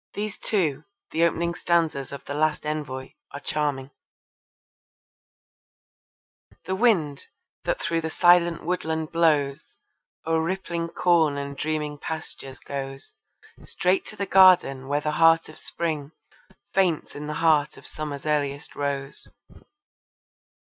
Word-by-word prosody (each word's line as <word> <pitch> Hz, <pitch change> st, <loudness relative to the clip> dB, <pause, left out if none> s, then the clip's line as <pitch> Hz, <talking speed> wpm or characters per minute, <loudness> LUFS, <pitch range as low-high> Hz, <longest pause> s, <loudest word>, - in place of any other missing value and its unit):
These 210 Hz, 0 st, -4 dB
too, 160 Hz, -8 st, 0 dB, 0.3 s
the 165 Hz, -, +1 dB
opening 170 Hz, 0 st, 0 dB
stanzas 165 Hz, -6 st, 0 dB
of 140 Hz, -, -8 dB
The 145 Hz, -, -5 dB
Last 155 Hz, +1 st, 0 dB
Envoy, 140 Hz, -4 st, -4 dB, 0.2 s
are 140 Hz, -, -5 dB
charming: 145 Hz, -2 st, -2 dB, 2.7 s
The 190 Hz, -, -2 dB
Wind, 180 Hz, -, +1 dB, 0.4 s
that -, -, 0 dB
through 165 Hz, -1 st, -1 dB
the 160 Hz, -, -3 dB
silent 175 Hz, 0 st, +4 dB
woodland 160 Hz, -3 st, -2 dB
blows 150 Hz, -5 st, +1 dB, 0.5 s
O'er 160 Hz, 0 st, +2 dB
rippling 170 Hz, -1 st, -2 dB
corn 165 Hz, -5 st, +3 dB
and 140 Hz, 0 st, -5 dB
dreaming 150 Hz, 0 st, -3 dB
pastures 135 Hz, -4 st, -6 dB
goes 135 Hz, -1 st, -7 dB, 0.5 s
Straight 185 Hz, +2 st, +1 dB
to -, -, -8 dB
the 200 Hz, -, -2 dB
garden 180 Hz, -9 st, +5 dB
where 145 Hz, +1 st, 0 dB
the 150 Hz, -, -1 dB
heart 165 Hz, 0 st, +6 dB
of 155 Hz, -, -13 dB
Spring 155 Hz, -3 st, -3 dB, 0.6 s
Faints 180 Hz, -5 st, +1 dB
in 150 Hz, +1 st, -6 dB
the 150 Hz, -, -3 dB
heart 155 Hz, -2 st, +2 dB
of -, -, -14 dB
Summer's 150 Hz, -2 st, -6 dB
earliest 145 Hz, -2 st, -1 dB
rose. 140 Hz, -1 st, -4 dB
155 Hz, 125 wpm, -25 LUFS, 145-170 Hz, 2.7 s, heart